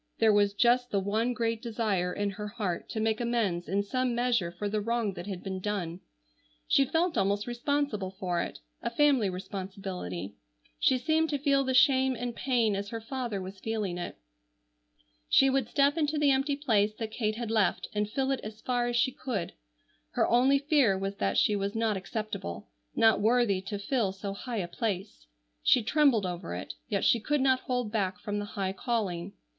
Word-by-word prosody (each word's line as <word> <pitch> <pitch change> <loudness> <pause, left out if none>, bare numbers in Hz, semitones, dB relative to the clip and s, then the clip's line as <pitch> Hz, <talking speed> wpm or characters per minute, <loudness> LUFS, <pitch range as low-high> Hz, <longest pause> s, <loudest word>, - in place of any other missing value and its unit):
There 220 -1 +4
was 205 -1 +3
just 245 +3 +3
the 200 - +1
one 215 +5 0
great 230 -2 -1
desire 215 -6 -1
in 205 +2 -1
her 210 +2 -6
heart 205 -5 -3
to 220 - -3
make 220 +1 0
amends 220 -8 0
in 200 +2 +1
some 255 +3 -1
measure 240 -7 +1
for 190 +4 -4
the 210 +1 -1
wrong 230 -2 0
that 175 +1 -8
had 190 -3 -5
been 190 -1 -4
done. 185 -4 -3 0.7
She 275 - +4
felt 325 +5 +1
almost 200 +1 +1
responsible 240 -5 -1
for 185 -2 -2
it, - - -5 0.2
a - - -1
family 260 -4 +3
responsibility. 185 - -5 0.5
She 260 - +4
seemed 315 +4 +1
to 290 - 0
feel 275 -1 +2
the 260 -1 0
shame 260 0 +5
and 245 0 -4
pain 235 -5 +1
as 200 +1 -4
her 230 - -4
father 235 -2 -4
was 190 +1 -8
feeling 210 -5 -2
it. 175 - -5 1.1
She 270 0 +5
would 265 -4 +1
step 280 0 +3
into 305 -1 0
the 295 -1 +4
empty 275 +2 +1
place 215 -7 +1
that 220 -1 -5
Kate 215 -2 -1
had 230 -1 -4
left 215 -4 +1
and 210 0 -1
fill 270 +4 0
it 270 - 0
as 215 0 -8
far 245 0 0
as 240 - -1
she 245 +2 +3
could. 230 -9 -4 0.6
Her - - +2
only 260 +4 +4
fear 275 -8 +3
was 195 +1 -3
that 95 0 0
she 210 - +4
was 200 +1 -2
not 225 -2 +1
acceptable, 200 - -5 0.3
not 225 -2 +4
worthy 220 -3 +3
to 205 - -3
fill 200 -1 0
so 195 0 -5
high 235 +3 -5
a 180 -4 -1
place. 195 - -4 0.3
She 245 - +4
trembled 265 -5 +3
over 175 - -4
it, 90 - -6 0.2
yet 200 - 0
she 235 - +4
could 290 +6 0
not 260 -1 +3
hold 250 -5 -2
back 190 -4 -1
from 205 0 -3
the 205 - -3
high 190 -1 -1
calling. 200 -5 -2
220 Hz, 195 wpm, -29 LUFS, 195-250 Hz, 1.1 s, shame